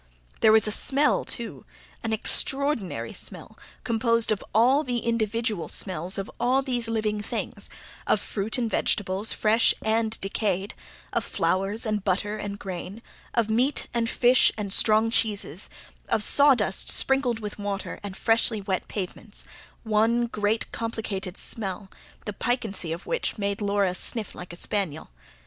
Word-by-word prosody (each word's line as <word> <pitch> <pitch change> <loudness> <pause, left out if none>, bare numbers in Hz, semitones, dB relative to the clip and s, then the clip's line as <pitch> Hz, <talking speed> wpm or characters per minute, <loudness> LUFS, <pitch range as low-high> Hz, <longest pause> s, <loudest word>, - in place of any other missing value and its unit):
There 220 - +6
was 220 0 +5
a 215 - -1
smell, 280 +7 +3
too, 235 -2 -5 0.4
an 225 - -2
extraordinary 270 0 +1
smell, - - -8 0.3
composed 230 -1 +2
of 210 - -1
all 255 +7 +4
the 245 -3 -2
individual 225 -4 -1
smells 185 0 -1
of 195 +5 -4
all 260 +2 +2
these 245 -3 -1
living 215 -2 -1
things: 210 - -4 0.4
of - - +3
fruit 210 +3 -2
and 240 -2 0
vegetables, 200 -1 0
fresh 220 +2 +3
and 220 0 +1
decayed; 195 0 -1 0.4
of - - 0
flowers, 195 +5 -1
and 215 -2 -1
butter, 200 +2 0
and 200 -1 -5
grain; 195 +3 -7 0.3
of 225 -2 +1
meat, 255 +6 +2
and 230 -1 0
fish, 250 +1 +5
and 200 -3 -2
strong 220 +1 +5
cheeses; 205 -6 0 0.4
of 220 -2 +2
sawdust 260 -9 +3
sprinkled 270 -4 +2
with 210 -1 -6
water, 205 0 -4
and 200 -2 -7
freshly 225 -1 +2
wet 195 -2 -2
pavements 205 +2 -6 0.4
one 225 +2 +2
great 215 -1 -1
complicated 210 -5 -4
smell, 195 -3 -4 0.3
the 210 - -4
piquancy 220 -7 -2
of 170 +3 -5
which - - -2
made 200 0 -2
Laura 200 -2 +1
sniff 215 +4 -1
like 180 -1 -9
a - - -8
spaniel. 175 - -2
215 Hz, 145 wpm, -26 LUFS, 200-230 Hz, 0.4 s, There